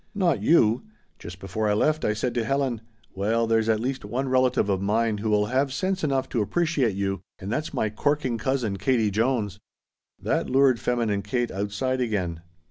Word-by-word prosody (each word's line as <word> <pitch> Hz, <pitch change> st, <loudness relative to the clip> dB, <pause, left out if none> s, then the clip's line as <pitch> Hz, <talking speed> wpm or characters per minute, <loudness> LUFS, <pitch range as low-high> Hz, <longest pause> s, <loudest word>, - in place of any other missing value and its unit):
"Not 180 Hz, -7 st, +1 dB
you! 115 Hz, -8 st, +4 dB, 0.4 s
Just 90 Hz, +1 st, -9 dB
before 100 Hz, +3 st, -2 dB
I -, -, +3 dB
left 155 Hz, +9 st, +1 dB
I 105 Hz, -, +2 dB
said 120 Hz, +3 st, -2 dB
to 120 Hz, -, 0 dB
Helen: 130 Hz, -2 st, -1 dB, 0.3 s
'Well 110 Hz, +4 st, +1 dB
there's 115 Hz, 0 st, +1 dB
at 110 Hz, -1 st, +3 dB
least 130 Hz, +3 st, -3 dB
one 120 Hz, +6 st, -2 dB
relative 130 Hz, -3 st, +2 dB
of 95 Hz, -2 st, 0 dB
mine 110 Hz, +1 st, +1 dB
who 110 Hz, +1 st, -2 dB
will 105 Hz, -1 st, +3 dB
have 130 Hz, +4 st, 0 dB
sense 185 Hz, +6 st, -1 dB
enough 135 Hz, -3 st, 0 dB
to 120 Hz, -, 0 dB
appreciate 145 Hz, -, 0 dB
you, 95 Hz, -2 st, -2 dB, 0.2 s
and 95 Hz, +2 st, -6 dB
that's 155 Hz, +5 st, -2 dB
my 110 Hz, -, -1 dB
corking 130 Hz, 0 st, 0 dB
cousin 125 Hz, -7 st, -1 dB
Katie 110 Hz, +1 st, +1 dB
Jones!'" 110 Hz, -2 st, 0 dB, 0.6 s
That -, -, -1 dB
lured 130 Hz, -2 st, +4 dB
feminine 115 Hz, -5 st, 0 dB
Kate 120 Hz, +4 st, -2 dB
outside 105 Hz, +7 st, -2 dB
again. 95 Hz, -8 st, -2 dB
115 Hz, 185 wpm, -25 LUFS, 105-130 Hz, 0.6 s, you